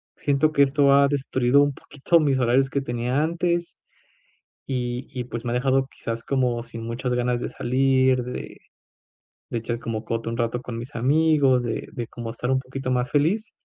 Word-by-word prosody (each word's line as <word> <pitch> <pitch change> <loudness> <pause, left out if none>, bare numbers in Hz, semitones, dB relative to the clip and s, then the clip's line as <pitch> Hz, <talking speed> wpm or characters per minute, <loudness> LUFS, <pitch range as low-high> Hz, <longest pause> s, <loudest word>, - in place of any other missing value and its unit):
siento 145 +2 +1
que 145 - +2
esto 140 0 +4
ha 140 0 +6
destruido 135 -1 +2
un 145 - 0
poquito 150 +5 +1
mis 140 -4 +2
horarios 130 +2 +2
que 140 - -1
tenía 125 +2 -1
antes, 170 +1 -1 0.9
y 125 -1 -3
y 125 - -3
pues 120 0 -7
me 120 - -1
ha - - -1
dejado, 130 +1 +2
quizás 115 -3 -6
como 125 -3 0
sin 115 -1 -8
muchas 125 +2 -3
ganas 125 0 0
de - - -3
salir, 130 0 +2
de 125 +1 -7 0.9
de - - -2
echar 115 +1 -3
como 115 -2 -4
coto 115 0 -3
un 115 - -4
rato 120 +1 -1
con 120 -2 -6
mis 120 +5 -7
amigos, 140 0 +3
de 115 - -3
de, 120 -2 -5
como 120 -1 -7
estar 125 +2 -3
un 130 - +2
poquito 130 0 -5
más 125 0 0
feliz 180 +10 +1
130 Hz, 190 wpm, -24 LUFS, 120-140 Hz, 0.9 s, ha